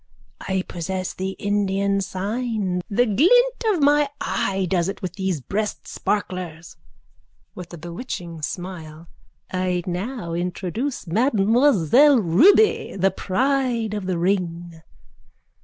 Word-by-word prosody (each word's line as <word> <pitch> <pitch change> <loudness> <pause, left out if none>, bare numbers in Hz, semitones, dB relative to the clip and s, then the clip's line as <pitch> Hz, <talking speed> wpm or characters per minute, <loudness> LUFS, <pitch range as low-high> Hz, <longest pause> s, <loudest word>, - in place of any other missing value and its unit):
_ - - -41 0.5
I 190 -1 0
possess 185 +2 -4
the 190 +1 -4
Indian 200 -1 0
sign. 200 -1 -2
The 240 +4 +2
glint 485 - +3
of 370 -9 +2
my 290 0 +4
eye 195 -1 -1
does 175 0 +1
it 200 - -5
with 180 -2 -3
these 190 -6 -2
breastsparklers. 185 -2 -3 0.8
(With 180 -1 -9
a 175 - -8
bewitching 170 - -7
smile.) 165 -1 -6 0.4
I 185 -1 -1
now 185 +1 -4
introduce 185 +10 -3
Mademoiselle 240 - +4
Ruby, 280 - +4
the 190 +1 +2
pride 245 0 0
of 205 -3 -4
the 185 -2 -1
ring. 175 -2 -2
190 Hz, 115 wpm, -22 LUFS, 180-235 Hz, 0.8 s, my